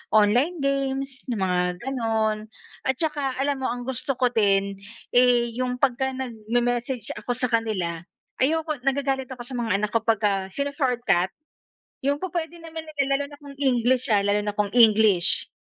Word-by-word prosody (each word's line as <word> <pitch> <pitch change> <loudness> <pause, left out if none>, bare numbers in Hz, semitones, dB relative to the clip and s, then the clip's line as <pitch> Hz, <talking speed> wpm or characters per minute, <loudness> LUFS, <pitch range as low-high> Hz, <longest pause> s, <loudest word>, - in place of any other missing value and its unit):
online 250 +10 +3
games, 275 -1 -2
ng 240 - -1
mga 180 -1 +1 0.2
gano'n. 220 -4 -1 0.4
At 265 - +2
tsaka 290 -4 -1
alam 275 0 0
mo, 260 - -1
ang 245 +1 -3
gusto 265 +2 -3
ko 250 -1 +2
din, 200 -3 +2 0.3
eh, 245 -1 +4
yung 250 -1 0
pagka 265 0 0
nagme-message 240 0 -2
ako 245 - -2
sa 250 -1 -2
kanila, 195 -8 0 0.4
ayoko 310 +1 +1
nagagalit 270 0 0
ako 240 - -8
sa 255 - -14
mga 225 -5 +1
anak 205 +1 -1
ko 230 - +3
pagka 200 -3 +2
shino-shortcut. 250 - +1 0.8
Yung 285 +1 +1
pu-pwede 340 -2 -4
naman 325 -1 -7
nila 310 -2 -6 0.2
lalo 285 - -2
na 285 - -13
kung 280 -1 -11
English 255 -2 +2
ha, 205 - +5
lalo 205 +1 +1
na 210 - -1
kung 205 0 0
English. 215 -5 +4
245 Hz, 160 wpm, -25 LUFS, 220-275 Hz, 0.8 s, ha